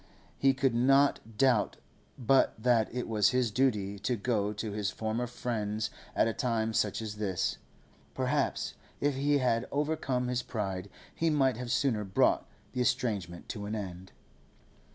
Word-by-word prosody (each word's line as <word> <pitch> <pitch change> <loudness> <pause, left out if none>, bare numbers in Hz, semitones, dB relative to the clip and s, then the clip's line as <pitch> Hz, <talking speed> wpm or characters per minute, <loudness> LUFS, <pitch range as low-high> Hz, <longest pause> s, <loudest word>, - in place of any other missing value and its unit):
He 135 -1 +3
could 130 -2 +2
not 130 -3 +3
doubt 125 -4 +3 0.4
but 130 +2 +3
that 115 -1 +2
it 125 +1 -3
was 105 -2 +3
his 125 -3 +1
duty 105 -5 +1
to 115 +5 0
go 105 -2 0
to 105 +1 -4
his 100 -1 -1
former 110 +3 -2
friends 110 -3 -2 0.2
at - - +4
a 115 - 0
time 115 -3 0
such 105 0 0
as 105 -1 -5
this. 95 -4 -1 0.6
Perhaps, - - 0 0.3
if 145 0 +1
he 145 +2 +2
had 125 -3 +1
overcome 140 -4 0
his 125 0 0
pride, 100 -5 -4 0.2
he 165 - +1
might 135 -6 +2
have 125 -1 -4
sooner 120 -4 +1
brought 95 -2 +2 0.2
the 125 - -2
estrangement 110 -9 -1
to 105 -2 -5
an 105 - -3
end. 95 -3 -6
115 Hz, 155 wpm, -30 LUFS, 105-130 Hz, 0.6 s, at